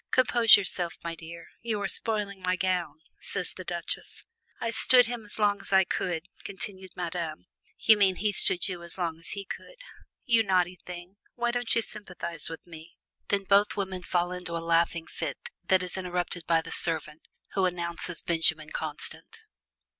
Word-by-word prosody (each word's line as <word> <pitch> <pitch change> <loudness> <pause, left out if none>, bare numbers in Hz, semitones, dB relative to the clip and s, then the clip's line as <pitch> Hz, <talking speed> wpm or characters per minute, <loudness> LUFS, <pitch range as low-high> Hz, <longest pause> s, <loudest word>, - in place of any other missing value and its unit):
"Compose 240 -3 +7
yourself, 180 -3 -1
my 170 0 -3
dear 165 +1 -10
you 220 -2 -2
are - - -1
spoiling 205 -4 -1
my 185 0 +1
gown," 180 -5 -1 0.2
says - - -2
the - - -8
Duchesse. - - -5 0.3
"I 230 - -1
stood 245 +2 +6
him 240 -1 -4
as 205 - -2
long 205 -2 +2
as - - -5
I 190 0 +6
could," 175 -1 -2 0.2
continued 190 -1 -4
Madame. 170 - -4 0.3
"You 220 -1 +6
mean 195 -2 +4
he 210 +3 0
stood 185 -2 +5
you 180 -3 -5
as 170 +1 -6
long 165 -3 -2
as 165 - -7
he 200 -1 -6
could." - - -8 0.5
"You 235 -3 +4
naughty 185 -3 +1
thing! 180 +2 -9 0.2
why 240 0 0
don't 245 -1 0
you 230 - +3
sympathize 175 -7 -2
with 165 - -8
me?" 165 0 -12 0.3
Then 200 -1 +1
both 200 +2 +3
women 190 -2 -2
fall 175 0 0
into 180 -2 -4
a 165 0 -6
laughing 165 0 +2
fit - - -5 0.3
that 185 -1 +4
is 180 - -5
interrupted 180 -2 -3
by 165 -1 +4
the 165 - -9
servant, 155 -2 0 0.3
who 190 -2 +3
announces 170 0 -4
Benjamin 160 -2 +1
Constant. - - -6
180 Hz, 175 wpm, -28 LUFS, 170-205 Hz, 0.5 s, Compose